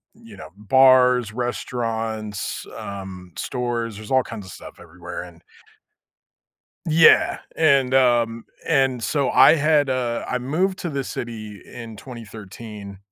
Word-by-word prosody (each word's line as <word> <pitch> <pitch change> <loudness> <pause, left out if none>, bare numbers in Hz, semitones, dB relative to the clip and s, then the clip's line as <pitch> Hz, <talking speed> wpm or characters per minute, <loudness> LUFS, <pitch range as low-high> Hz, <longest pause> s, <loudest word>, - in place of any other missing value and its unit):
you 230 0 -15
know, - - -10
bars, 125 0 +4
restaurants, 115 -3 -3
um, 95 -3 -8
stores, 120 -3 -3
there's 110 +2 -10
all 130 -1 +4
kinds 110 -5 -8
of - - -10
stuff - - -12
everywhere, 85 +1 -8
and 85 -2 -15 1.5
Yeah, 160 +1 +5 0.2
and 140 -5 +3
um, 120 -3 +2 0.2
and, 135 -5 +1
so, 140 0 0
I 155 - +7
had, 150 -2 +2
uh 125 -2 -1
I 125 - -1
moved 175 +9 -1
to 175 - -3
the 140 -2 -3
city 110 -5 -7
in 115 -3 -10
2013, 105 -3 -10
120 Hz, 130 wpm, -22 LUFS, 105-135 Hz, 1.5 s, I